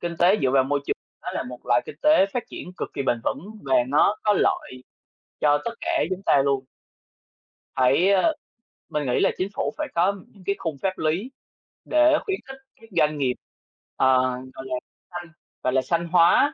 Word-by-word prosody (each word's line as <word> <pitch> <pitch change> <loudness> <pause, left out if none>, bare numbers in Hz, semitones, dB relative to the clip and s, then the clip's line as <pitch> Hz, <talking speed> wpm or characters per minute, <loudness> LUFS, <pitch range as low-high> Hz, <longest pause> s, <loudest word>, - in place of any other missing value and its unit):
kinh 170 -1 -4
tế 185 +4 +5
dựa 130 - +3
vào 135 0 +4
môi 140 +1 0
trường, - - 0 0.3
nó - - -6
là - - -2
một 125 0 -8
loại 120 0 +3
kinh - - -8
tế 305 -10 +5
phát 245 - -1
triển 180 - -8
cực - - -4
kỳ 140 - -3
bền 120 -3 0
vững - - -1 0.2
và 135 -1 +1
nó 150 +9 +3
có 210 - +3
lợi 130 -9 0 0.6
cho 145 -1 +4
tất 235 - -2
cả 340 -2 0
chúng 185 +1 -3
ta 140 -8 +4
luôn. 135 -1 +1 1.1
Phải, 135 +9 +4
ờ 200 - +4 0.6
mình 150 -2 -2
nghĩ 125 - +1
là - - +4
Chính 185 - -1
phủ - - -1
phải 305 -1 -2
có 185 +4 +2
những 200 - -19
cái 200 - +1
khung 160 -5 -4
pháp 190 -1 -1
lý 175 +11 -1 0.6
để 310 0 +4
khuyến 390 -3 -1
khích 265 0 -9 0.2
các 225 - -16
doanh 150 -2 +3
nghiệp, 130 -3 +1 0.6
ờ, 130 -1 +4 0.3
gọi 130 - -9
là, 130 - -4 0.4
xanh, 175 -1 -7 0.3
gọi 130 - +1
là, 130 - +3
xanh 170 +4 -1
hóa 175 - +5
170 Hz, 205 wpm, -24 LUFS, 135-200 Hz, 1.1 s, tế